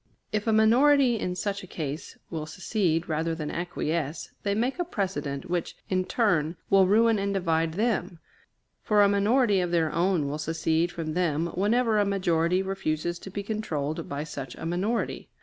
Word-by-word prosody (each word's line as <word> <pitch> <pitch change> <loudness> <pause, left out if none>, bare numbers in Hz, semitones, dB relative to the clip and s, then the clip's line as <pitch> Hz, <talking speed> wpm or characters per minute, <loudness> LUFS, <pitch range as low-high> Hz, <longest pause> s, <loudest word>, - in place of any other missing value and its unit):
If 215 +1 -2
a - - +4
minority 240 +3 +5
in 180 -2 -2
such 200 +2 -2
a 185 - -11
case 150 -2 -5
will 155 -2 -4
secede 170 -1 -1
rather 160 +1 -1
than 155 -2 -4
acquiesce, 170 -3 -3
they 200 -1 0
make 250 - -1
a - - +2
precedent 185 - -3
which, 175 -1 -2
in 185 -1 +1
turn, 175 -9 +1
will 195 -1 +6
ruin 225 +2 +4
and 200 0 -1
divide 165 -3 +1
them, 215 -4 0 0.6
for 210 -1 +4
a - - +6
minority 205 +1 +3
of 180 -1 0
their 165 -3 +1
own 170 -3 +1
will 145 +2 -3
secede 165 +2 0
from 160 -2 -4
them 170 -1 0
whenever 220 +3 +2
a 205 - +3
majority 180 -2 +1
refuses 175 -3 -2
to - - -9
be 200 +1 -5
controlled 165 -8 -3
by 140 +1 -3
such 140 -5 -7
a - - -7
minority. 190 +8 -2
180 Hz, 175 wpm, -27 LUFS, 160-205 Hz, 0.6 s, will